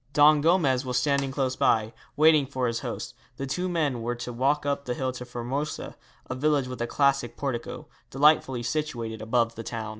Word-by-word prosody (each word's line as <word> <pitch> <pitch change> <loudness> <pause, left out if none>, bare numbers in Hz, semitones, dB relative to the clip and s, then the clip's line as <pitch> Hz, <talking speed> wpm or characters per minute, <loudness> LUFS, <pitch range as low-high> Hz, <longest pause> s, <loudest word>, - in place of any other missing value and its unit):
Don 150 0 +6
Gomez 150 -6 +3
was 125 -2 -1
standing 140 +1 +1
close 135 -2 -1
by, 110 0 +2 0.2
waiting 155 -2 +5
for 130 -2 -2
his 115 -1 -1
host. - - -5 0.2
The 135 - -3
two 180 +7 -2
men 150 -8 0
were 120 +1 -2
to 120 0 -6
walk 140 +5 +1
up 140 0 -1
the 125 - -2
hill 130 0 -1
to 125 -1 -8
Formosa, 125 +5 -4 0.3
a - - -3
village 140 0 +1
with 125 -1 -6
a 120 - -1
classic 135 -3 +1
portico, 130 -4 -4 0.2
delightfully 135 -3 +3
situated 120 -5 -3
above 115 +1 +1
the 115 - -7
town. 115 -1 -5
130 Hz, 190 wpm, -26 LUFS, 120-145 Hz, 0.3 s, Don